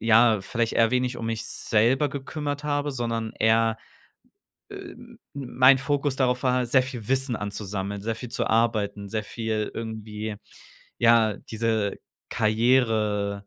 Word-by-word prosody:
ja, 115 -1 +5
vielleicht 115 +3 -1
eher 115 -1 +4
wenig 125 0 0
um 115 - -4
mich 115 0 -2
selber 120 +7 +1
gekümmert 145 +1 -5
habe, 145 0 -1
sondern 115 -3 -3
eher, 115 0 +3 0.9
äh, - - -8 0.2
m 240 -1 -15 0.2
mein 130 -1 +4
Fokus 140 0 -1
darauf 125 -2 +1
war, 125 -1 +2
sehr 130 +2 +4
viel 125 -5 -7
Wissen 130 -1 +2
anzusammeln, 100 -1 -4
sehr 115 +2 -2
viel 125 - -7
zu 125 - -2
arbeiten, 110 -3 0
sehr 110 +1 -3
viel 110 -1 -3
irgendwie, 110 -1 -5 0.6
ja, 115 -3 +4
diese 110 -2 -2 0.3
Karriere 110 -3 +1
115 Hz, 140 wpm, -25 LUFS, 110-130 Hz, 0.9 s, ja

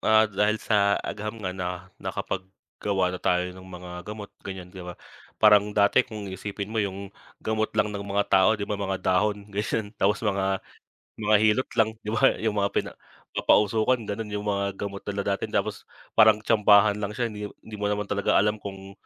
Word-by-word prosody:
ah, 110 0 +5
dahil 105 +1 +1
sa 100 -2 +2
agham 105 +2 -4
nga 90 - -1
na 90 0 -5
nakapaggawa 95 0 -3
na 90 - -5
tayo 90 0 +1
ng 95 - -12
mga 90 -1 -10 0.2
gamot 105 -1 -7
ganyan 95 -2 -8
'di 95 - -9
ba. 90 0 -8 0.4
Parang 105 -1 +6
dati 100 -1 +5
kung 110 -5 -6
iisipin 100 +2 -5
mo 110 - +1
yung 100 -1 -4 0.3
gamot 110 0 0
lang 105 -1 +2
ng 100 - -4
mga 100 0 0
tao 95 +3 +5
'di 100 - -3
ba, 105 0 -4
mga 95 -1 -1
dahon 100 +2 +1
ganyan 105 +1 -2
tapos 105 +3 +2
mga 95 -1 0 0.5
mga 105 -1 +3
hilot 110 +4 +3
lang 110 - +4 0.2
'di 105 - -3
ba? 135 +3 +5
'Yung 110 -1 -1
mga 100 - +2
pina - - 0 0.4
papausukan 110 +4 +3
ganon 105 +1 -4
yung 105 0 -4
mga 100 -1 -1
gamot 100 0 -5
nila 100 -1 -2
dati 100 - -2
tapos - - -2 0.2
parang 110 -1 +5
tsambahan 105 -1 +5
lang 105 +1 -4
siya 120 -1 -1
hindi 105 0 -5 0.2
hindi 110 - -8
mo 105 - +1
naman 105 0 -1
talaga 100 0 +1
alam 105 +1 +2
kung 95 -1 -8
105 Hz, 190 wpm, -26 LUFS, 95-105 Hz, 0.5 s, Parang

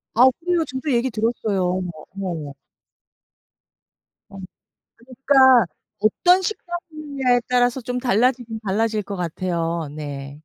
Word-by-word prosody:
아 245 - +7
그래요. 350 -1 +1
저도 260 +3 -4
얘기 240 +2 +1
들었어요. 220 -3 -1 0.2
어머 180 -1 -4 0.2
어머머. 165 -7 -5 1.8
엄. 195 -1 -10 0.8
그러니까 260 -6 +6 0.3
어떤 355 - +3
식당이냐에 305 -9 -2
따라서 245 +1 +2
좀 250 +1 -3
달라지긴 240 -1 +1
달라질 215 +2 0
것 200 +1 -6
같아요. 170 -2 -2
네. 140 -2 -6
235 Hz, 260 characters per minute, -22 LUFS, 185-260 Hz, 1.8 s, 아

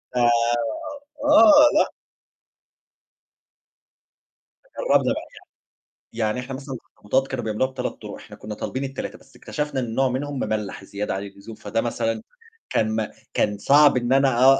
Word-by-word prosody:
آآ، - - +2 0.8
آه، 295 +1 +6
لأ. - - +2 2.9
جرّبنا - - +3
بقى - - -4 0.9
يعني، 115 - -9
يعني 110 +4 -2
إحنا 125 +1 -6
مثلًا 135 0 -7
الأخطبوطات 130 +2 -2
كانوا 130 -3 -4
بيعملوها 110 +5 0
ب3 - - -5
طُرق - - -7
إحنا - - -12
كنّا 105 0 -7
طالبين 130 +5 -4
ال3، 135 0 -5
بس 135 - -22
اكتشفنا 150 +2 -3
إن 115 -3 -3
نوع 135 -1 +3
منهم 140 +2 -3
مملّح 105 -4 -3
زيادة 100 +1 -4
عن 95 - -4
اللزوم 100 +2 -10
فده 110 +2 -2
مثلًا 115 - -2 0.5
كان 110 0 +1
ما 110 -1 -2 0.2
كان 105 -1 +1
صعب 145 +5 +5
إن 120 +1 +1
أنا 135 -1 +5
أ - - +3
130 Hz, 150 wpm, -23 LUFS, 110-135 Hz, 2.9 s, آه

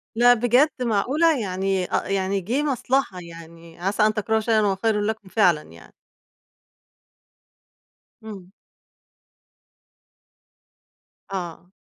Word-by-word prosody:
لأ، 245 +1 +6
بجد! 245 +5 +3
معقولة؟ 260 +7 +1
يعني 190 -1 -1
آآ، - - 0
يعني 195 0 -1
جه 245 +11 -1
مصلحة 265 -7 -1
يعني، 165 0 -13
عسى 195 +4 0
أن 215 - +2
تكرهوا 220 +1 0
شيئًا 220 0 +1
وهو 200 -2 +1
خيرٌ 210 +1 0
لكم 210 -2 -4
فعلًا 180 -8 +3
يعني. 85 - -17 2.3
امم. 195 -4 -10 2.8
آه. 175 -2 -6
205 Hz, 100 wpm, -23 LUFS, 185-230 Hz, 2.8 s, لأ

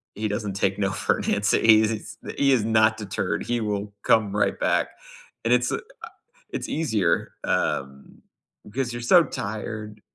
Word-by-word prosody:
he 110 +1 -2
doesn't 105 -1 -3
take 100 0 0
no 95 -1 +1
for 95 - 0
an - - -1
answer, 100 +1 +2
he 110 -1 +6
is 110 0 -3 0.2
he 140 -1 +3
is 115 -5 +3
not 110 0 +3
deterred, 105 -3 -3
he 120 -1 -1
will 105 -1 -3
come 105 -3 +3
right 105 - +1
back, - - +2 0.6
and - - +4
it's - - +2
uh, - - 0 0.7
it's - - -4
easier, 110 - 0
um, 70 0 -2 0.4
because 125 +3 -3
you're 120 - -5
so 170 +7 +6
tired. 105 -1 -6
105 Hz, 165 wpm, -24 LUFS, 100-110 Hz, 0.7 s, he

